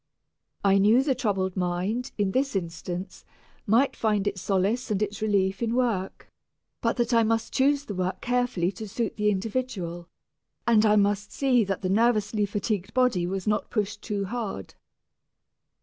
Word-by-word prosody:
I 195 0 +4
knew 220 +6 +5
the 275 -1 +2
troubled 195 -7 -1
mind, 185 +7 -1
in 200 -2 +1
this 270 +2 0
instance, 175 +1 -5 0.4
might 235 +7 +3
find 210 -3 0
its 200 -3 -2
solace 200 +7 0
and 205 -3 0
its 210 0 -3
relief 195 -2 +1
in 230 0 0
work, 230 -7 -1 0.5
but - - 0
that 240 0 0
I 230 - +5
must 225 0 0
choose 285 +1 +2
the 205 - -5
work 185 0 -2
carefully 245 -8 0
to 210 +2 -8
suit 230 +1 -2
the 210 0 +1
individual, 190 -5 -3 0.6
and 220 -2 +4
I 210 - +5
must 205 0 +1
see 255 -4 +2
that 195 0 -3
the - - +1
nervously 215 0 +2
fatigued 205 0 -3
body 250 -9 +2
was 190 0 -3
not 210 0 0
pushed 210 -1 -2
too 205 -3 -2
hard. 205 - -5
210 Hz, 165 wpm, -26 LUFS, 190-235 Hz, 0.6 s, knew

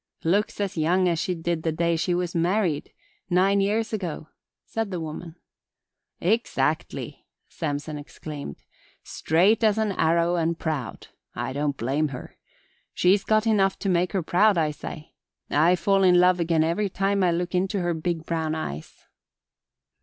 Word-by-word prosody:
"Looks 200 +7 +1
as 200 -3 -2
young 180 +4 +2
as 170 -2 +1
she 180 +2 -1
did 170 0 -2
the 160 - 0
day 170 +1 +1
she 175 +2 0
was 175 -1 -2
married 175 -2 0 0.4
nine 195 +2 +3
years 215 +3 0
ago," 170 -6 -4 0.4
said 225 -2 -3
the 180 -3 -3
woman. 160 +1 -7 0.8
"Exactly!" 220 +7 -1 0.2
Samson 150 -1 -4
exclaimed. 145 - -8 0.4
"Straight 190 +8 +2
as 215 -1 +3
an 220 -2 +1
arrow 170 0 +2
and 165 0 0
proud! 150 -9 -4 0.3
I 130 - -3
don't 145 0 -1
blame 140 +6 0
her. 130 -3 -9 0.6
She's 195 +2 +3
got 215 0 +2
enough 195 -4 +2
to 195 - -2
make 180 0 +1
her 190 -3 0
proud 195 +4 +3
I 155 -2 +2
say. 155 +1 -9 0.4
I 165 +5 +4
fall 195 +3 +2
in 180 -2 +5
love 180 0 +4
again 165 -2 +2
every 175 +6 0
time 195 +1 0
I 180 - +4
look 175 +1 -1
into 185 +2 0
her 175 -1 0
big 165 0 -3
brown 160 -2 -1
eyes." 75 - -7
175 Hz, 160 wpm, -25 LUFS, 160-195 Hz, 0.8 s, in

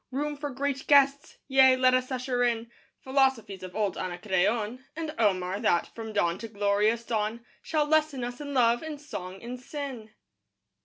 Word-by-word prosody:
Room 290 +3 -2
for 290 0 -5
great 275 0 -3
guests! 280 0 +4
Yea, 265 -1 +6
let 255 0 +4
us 255 +1 +1
usher 250 -1 -1
in 235 -1 0 0.3
Philosophies 260 -7 +1
of 185 0 -9
old 210 -2 -1
Anacreon 210 +6 -1
And 315 -1 -4
Omar, 190 -3 +1
that, 190 -6 +1
from 225 -1 -7
dawn 185 -4 0
to 230 - -6
glorious 210 +2 +1
dawn, 225 +1 -2 0.2
Shall 305 -2 0
lesson 305 -4 +1
us 245 +3 -5
in 285 -1 -5
love 240 -1 +4
and 315 -2 -6
song 190 -9 -8
and 245 +1 -6
sin. 255 -4 -6
245 Hz, 165 wpm, -28 LUFS, 210-275 Hz, 0.3 s, Yea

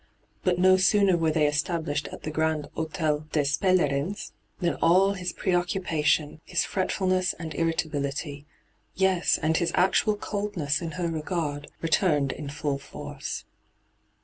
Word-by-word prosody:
But 180 -1 +2
no 185 +1 +6
sooner 190 0 +4
were 165 -1 +1
they 155 -1 +2
established 150 0 -1
at - - -10
the 155 - -3
Grand 160 -1 0
Hdtel 155 -2 -2
des 150 - +2
P^lerins, 160 +2 +1 0.3
than 175 -4 +1
all 190 +4 +5
his 180 -2 -3
preoccupation, 165 -4 0
his - - 0
fretfulnesB 185 -1 0
and 160 -2 -6
irritability 145 -2 -2 0.3
— - - -42
yes, 190 -2 +2
and 160 +1 +1
his 170 -2 +1
actual 195 +3 +3
coldness 200 -9 -2
in 165 -2 -4
her 180 -2 -2
r^ard 155 -2 -3
— - - -36
returned 150 -4 +2
in 150 - -7
fiill 145 -1 -2
force. 140 - -7
165 Hz, 145 wpm, -26 LUFS, 150-185 Hz, 0.3 s, no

